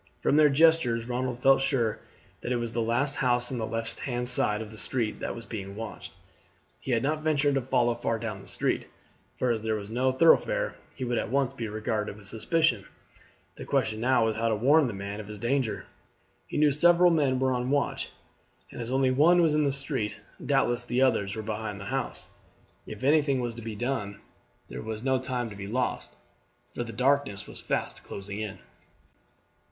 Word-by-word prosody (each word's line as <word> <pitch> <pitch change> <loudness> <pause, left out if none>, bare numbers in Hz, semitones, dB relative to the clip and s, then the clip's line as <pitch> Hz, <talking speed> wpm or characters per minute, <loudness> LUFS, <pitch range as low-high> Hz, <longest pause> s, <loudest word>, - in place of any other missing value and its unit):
From - - +3
their 150 -1 +6
gestures 140 -6 +3
Ronald 125 0 -2
felt 135 0 +6
sure 120 -6 0 0.4
that 120 - -4
it - - +2
was 120 -1 -2
the 115 - 0
last 130 +6 0
house 125 -1 +1
on 125 - -3
the 110 - -2
left 115 +1 -3
hand 125 -1 -2
side 105 -4 +3
of 110 -1 -7
the 110 - -11
street 115 -4 -1
that - - -3
was 115 -1 -9
being 100 -3 -6
watched. 110 0 -7 0.7
He - - -9
had 120 -2 +2
not 155 +2 0
ventured 145 -2 +2
to 135 - +1
follow 120 -1 +2
far 115 -1 -1
down 110 -4 -5
the - - -13
street, - - -1 0.5
for 125 - +1
as 115 -2 -1
there 110 0 0
was 105 0 -6
no 130 +3 +2
thoroughfare - - +3 0.2
he 130 - -5
would 120 -1 0
at - - -3
once 135 0 +1
be 115 - -4
regarded 105 -1 -3
with 105 - -13
suspicion. 120 - +1 0.7
The - - -7
question 110 0 0
now 125 -1 +3
was 110 -1 -1
how 115 +1 +1
to 110 - +2
warn 140 +7 +4
the 115 - -4
man 100 +1 -5
of 105 - -8
his 105 0 -8
danger. 120 +2 -1 0.6
He - - -4
knew 150 -1 +5
several 175 +4 +5
men 140 -5 +2
were 130 0 +1
on 125 0 -1
the 145 - +3
watch, 145 - -1 0.6
and - - -7
as 115 - -5
only 130 0 +2
one 160 +7 +5
was 165 -3 +4
in 150 0 +2
the 140 - +2
street, 135 -6 -2 0.3
doubtless 120 0 +1
the 120 +2 +1
others 100 -6 +1
were 110 - -4
behind 105 -1 -4
the 100 - -8
house. - - -3 0.6
If 110 +2 -8
anything 145 -1 +3
was 120 -1 -2
to 115 - -9
be 110 -1 -6
done 105 -4 -3 0.5
there - - -7
was 110 0 -5
no 130 -1 +2
time 125 -2 -2
to - - -8
be 100 0 -7
lost, 125 +4 -2 0.6
for 120 - -3
the 115 - -7
darkness 130 -4 +1
was - - -9
fast - - -2
closing 100 +1 -7
in. 105 -2 -4
120 Hz, 210 wpm, -28 LUFS, 110-135 Hz, 0.7 s, their